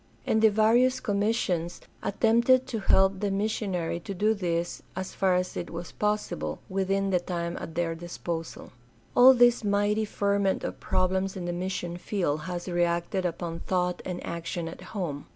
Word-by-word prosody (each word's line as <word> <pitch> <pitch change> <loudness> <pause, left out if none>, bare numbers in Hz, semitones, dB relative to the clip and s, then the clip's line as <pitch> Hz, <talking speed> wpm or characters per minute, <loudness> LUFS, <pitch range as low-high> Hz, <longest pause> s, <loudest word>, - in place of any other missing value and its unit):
And 220 - +2
the 220 - +7
various 235 +5 +3
commissions 200 -6 0 0.2
attempted 235 +5 +3
to 240 -4 -3
help 190 -1 +3
the 205 0 0
mis 200 +3 0
sionary 175 -4 -2
to 195 - -5
do 215 +4 +2
this 175 -4 -2
as 185 0 -4
far 190 -2 +2
as 180 0 -1
it - - -4
was 170 +1 -7
possible 210 - -2
within 195 +1 0
the 180 - +3
time 170 -1 -3
at 160 - -7
their 170 -1 0
disposal. 170 0 -6 0.4
All 255 +2 +9
this 240 -1 +5
mighty 205 +1 +1
ferment 200 -1 0
of - - -4
problems 190 +1 0
in 180 - -4
the 175 - -2
mission 175 -1 -3
field 175 -6 -1
has 175 0 -4
reacted 175 +1 0
upon 165 -1 -5
thought 180 -1 -1
and 180 -1 -5
action 170 0 -4
at 165 - -8
home. 165 -9 -5
185 Hz, 170 wpm, -27 LUFS, 175-210 Hz, 0.4 s, All